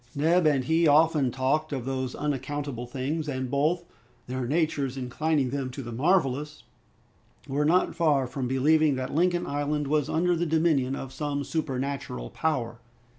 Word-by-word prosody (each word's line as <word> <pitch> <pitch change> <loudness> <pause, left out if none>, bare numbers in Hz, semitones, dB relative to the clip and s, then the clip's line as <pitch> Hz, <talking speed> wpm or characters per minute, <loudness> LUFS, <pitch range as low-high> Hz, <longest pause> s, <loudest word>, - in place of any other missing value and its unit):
Neb 165 +4 +3
and 140 -4 +2
he 160 +4 +3
often 150 -2 +4
talked 135 +5 0
of 130 -4 -3
those 130 -1 -3
unaccountable 140 -3 -3
things, 145 +5 -3
and 130 -2 -3
both, 155 +5 +1 0.4
their 130 -1 -3
natures 145 -3 0
inclining 135 +1 0
them 135 -2 -2
to 130 +2 -7
the 120 - -7
marvelous, 150 +1 0 0.8
were 145 +2 0
not 175 +4 +3
far 150 -6 +2
from 125 0 -4
believing 145 +3 +3
that 130 0 -4
Lincoln 175 +2 +2
Island 145 +1 -1
was 150 +1 0
under 175 +2 +2
the 170 +1 -1
dominion 155 -5 +2
of 135 -1 -7
some 140 +1 -2
supernatural 135 - -3
power. 120 -8 -2
145 Hz, 155 wpm, -27 LUFS, 130-155 Hz, 0.8 s, often